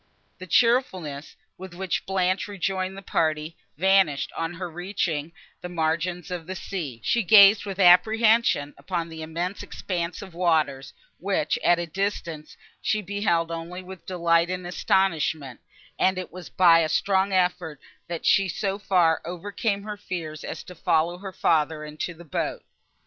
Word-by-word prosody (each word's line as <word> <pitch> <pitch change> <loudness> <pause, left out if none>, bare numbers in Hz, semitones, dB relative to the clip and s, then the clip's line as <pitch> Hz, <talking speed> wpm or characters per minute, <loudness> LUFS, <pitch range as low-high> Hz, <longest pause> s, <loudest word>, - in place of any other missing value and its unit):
The 185 - -9
cheerfulness, 185 - +1 0.2
with 185 -2 -9
which 190 0 -3
Blanche 190 0 0
rejoined 190 -1 -3
the 195 - -9
party, 155 -2 -1 0.2
vanished, 190 -5 +3
on 165 +1 -3
her 180 +1 -5
reaching 170 -3 -3 0.3
the 180 - -6
margin 170 +1 -1
of 175 -2 -5
the 185 - -5
sea; 160 - -5
she 235 - +2
gazed 205 +1 +7
with 195 -1 -5
apprehension 210 -3 +4
upon 170 -3 -3
the 160 -1 -8
immense 170 +5 -4
expanse 175 0 -4
of 190 -3 -12
waters, 160 -6 0 0.3
which, - - 0
at 175 - +4
a 175 - -2
distance, 170 -3 -4 0.2
she 215 - +1
had 210 - -5
beheld 175 -4 0
only 170 +2 -6
with 185 -1 -11
delight 170 -2 +2
and 180 -1 -4
astonishment, 160 -7 0 0.4
and 190 0 +2
it 185 - -5
was 180 -2 -9
by 170 -3 +6
a 160 -1 +1
strong 195 +4 +1
effort, 180 -4 0 0.3
that 170 -1 -5
she 195 0 +4
so 195 +2 -2
far 180 -5 +2
overcame 200 +4 -3
her 210 0 -6
fears 165 -6 -6
as - - -6
to 180 - -11
follow 170 0 0
her 195 0 -7
father 155 -3 +1
into 155 +3 -5
the 170 +1 -13
boat. 150 - -3
180 Hz, 160 wpm, -25 LUFS, 165-190 Hz, 0.4 s, gazed